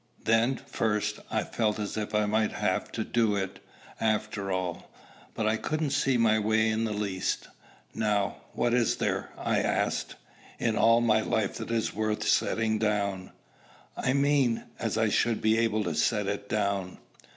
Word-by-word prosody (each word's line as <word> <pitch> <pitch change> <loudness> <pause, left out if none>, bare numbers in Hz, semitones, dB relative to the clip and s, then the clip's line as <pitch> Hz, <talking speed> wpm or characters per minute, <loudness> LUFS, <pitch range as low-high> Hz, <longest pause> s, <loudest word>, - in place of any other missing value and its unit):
Then 115 +4 +3
first 105 -1 -1
I 110 -1 0
felt 110 -2 -1
as 105 -1 -4
if 105 -1 -3
I 105 0 +3
might 110 +1 +1
have - - -1
to - - -1
do 115 -3 +1
it, 95 -1 -3 0.4
after 105 -2 -1
all. 90 -2 -3 0.5
But 110 - -1
I 110 +1 +2
couldn't 155 +3 -2
see 135 -2 +2
my 110 -2 +3
way 110 +1 +2
in 110 +1 0
the 110 - -2
least. 100 -3 -2 0.4
"Now, 105 -2 0 0.2
what 120 - +1
is 120 -2 +2
there," - - -1
I - - 0
asked, - - -1 0.4
"in 115 -2 0
all 115 +1 +5
my 110 -2 +3
life 110 -2 0
that - - -6
is 115 -1 0
worth 110 0 -1
setting 110 0 +2
down, 100 -3 -1 0.7
I 130 - 0
mean, 140 -4 +2 0.2
as - - -1
I - - +2
should 115 -2 +1
be 110 +1 +3
able 110 -2 +1
to 85 -4 -2
set 105 +6 +1
it 100 +1 -4
down?" 100 -3 -1
110 Hz, 170 wpm, -28 LUFS, 105-115 Hz, 0.7 s, all